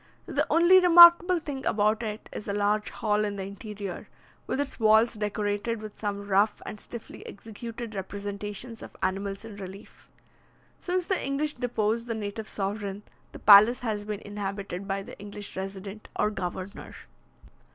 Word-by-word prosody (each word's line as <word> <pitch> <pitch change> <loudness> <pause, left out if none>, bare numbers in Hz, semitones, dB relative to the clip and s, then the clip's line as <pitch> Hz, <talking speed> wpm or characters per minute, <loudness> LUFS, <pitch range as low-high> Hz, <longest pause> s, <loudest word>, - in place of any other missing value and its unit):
The - - -1
only 345 +3 +6
remarkable 350 0 +8
thing 280 -4 -6
about 215 +1 +1
it 215 -2 -5
is - - -7
a 200 - -1
large 205 +1 +1
hall 210 -1 0
in 205 -1 -2
the 195 -1 -4
interior, 200 -1 -7 0.4
with - - -2
its 285 -2 -3
walls 220 +1 +5
decorated 210 +1 -2
with 215 -1 -10
some 200 -1 -4
rough 205 +2 +2
and 210 - -7
stiffly 235 +2 -10
executed 225 +2 -8
representations 205 +3 -6
of - - -11
animals 195 +2 -2
in 215 -3 -10
relief. 195 0 -11 0.7
Since 360 0 -1
the 380 - 0
English 285 +2 -1
deposed 230 -2 -1
the 230 - -2
native 215 0 -5
sovereign, 200 0 -3 0.3
the - - -10
palace 215 +4 +7
has 215 -4 -2
been 210 0 -5
inhabited 200 -2 -5
by 195 0 -2
the - - -12
English 205 0 -7
resident, 195 +2 -7
or 210 - +1
governor. 185 0 -6
210 Hz, 155 wpm, -27 LUFS, 200-230 Hz, 0.7 s, remarkable